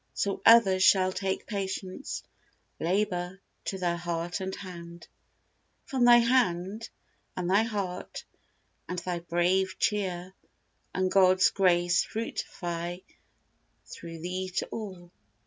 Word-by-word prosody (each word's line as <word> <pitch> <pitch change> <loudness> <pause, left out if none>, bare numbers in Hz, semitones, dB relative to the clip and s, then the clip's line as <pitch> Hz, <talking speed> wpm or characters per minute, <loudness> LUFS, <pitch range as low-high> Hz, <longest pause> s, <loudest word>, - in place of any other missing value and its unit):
So 200 -1 -1
others 200 -5 +7
shall 185 -1 +5
Take 190 +1 -2
patience, 195 +3 -4 0.6
labor, 180 0 -1 0.3
to 195 - -3
their 175 -2 0
heart 170 +1 -3
and 190 0 -3
hand, 170 -2 -10 0.8
From 260 -4 +1
thy 240 0 +9
hand, 225 -4 +1 0.5
and 180 -1 -2
thy 195 +3 +4
heart, 200 -5 -4 0.6
and 180 - -3
thy 175 0 -3
brave 180 +3 +1
cheer, 185 -3 -1 0.6
And 185 0 0
God's 185 -1 +5
grace 175 -2 +3
fructify 175 -6 -4 0.9
through 165 -1 -9
thee 185 +2 -3
to - - 0
all. 185 -6 -7
185 Hz, 115 wpm, -28 LUFS, 175-195 Hz, 0.9 s, thy